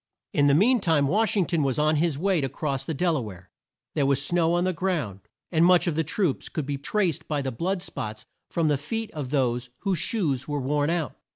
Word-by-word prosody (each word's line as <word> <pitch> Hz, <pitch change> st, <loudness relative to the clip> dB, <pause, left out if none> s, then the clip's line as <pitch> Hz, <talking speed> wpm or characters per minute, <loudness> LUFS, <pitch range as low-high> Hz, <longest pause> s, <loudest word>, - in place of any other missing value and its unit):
In 145 Hz, -, +4 dB
the 140 Hz, -, +5 dB
mean 240 Hz, -, +4 dB
time 160 Hz, -7 st, +2 dB
Wash 215 Hz, +6 st, +2 dB
ing 190 Hz, -, +3 dB
ton 165 Hz, -2 st, 0 dB
was 135 Hz, -3 st, 0 dB
on 155 Hz, +1 st, +3 dB
his 160 Hz, -2 st, +1 dB
way 185 Hz, 0 st, +1 dB
to 135 Hz, -, -1 dB
cross 135 Hz, -2 st, -3 dB
the 160 Hz, -, -2 dB
Del 170 Hz, +2 st, +1 dB
a -, -, -1 dB
ware. 95 Hz, -5 st, -10 dB, 0.4 s
There 140 Hz, -3 st, +1 dB
was 140 Hz, -1 st, +2 dB
snow 165 Hz, +3 st, +1 dB
on 175 Hz, -, +1 dB
the 185 Hz, 0 st, +1 dB
ground, 155 Hz, -, -2 dB, 0.3 s
and 160 Hz, -2 st, +2 dB
the -, -, +6 dB
march 180 Hz, -1 st, +5 dB
of 170 Hz, -4 st, 0 dB
the 160 Hz, -, +1 dB
troops 165 Hz, -1 st, -1 dB
could 155 Hz, -, -3 dB
be 140 Hz, 0 st, -3 dB
traced 175 Hz, +1 st, -1 dB
by 145 Hz, -2 st, -1 dB
the 135 Hz, -, -2 dB
blood 180 Hz, +9 st, -2 dB
spots 110 Hz, 0 st, -6 dB, 0.2 s
from 165 Hz, -2 st, 0 dB
the 145 Hz, -3 st, +2 dB
feet 225 Hz, +9 st, -3 dB
of 145 Hz, -5 st, -5 dB
those 125 Hz, -3 st, 0 dB
whose 195 Hz, -5 st, 0 dB
shoes 155 Hz, -, 0 dB
were 145 Hz, -1 st, -2 dB
worn 145 Hz, +2 st, 0 dB
out. 165 Hz, -7 st, -1 dB
155 Hz, 245 wpm, -26 LUFS, 135-175 Hz, 0.4 s, the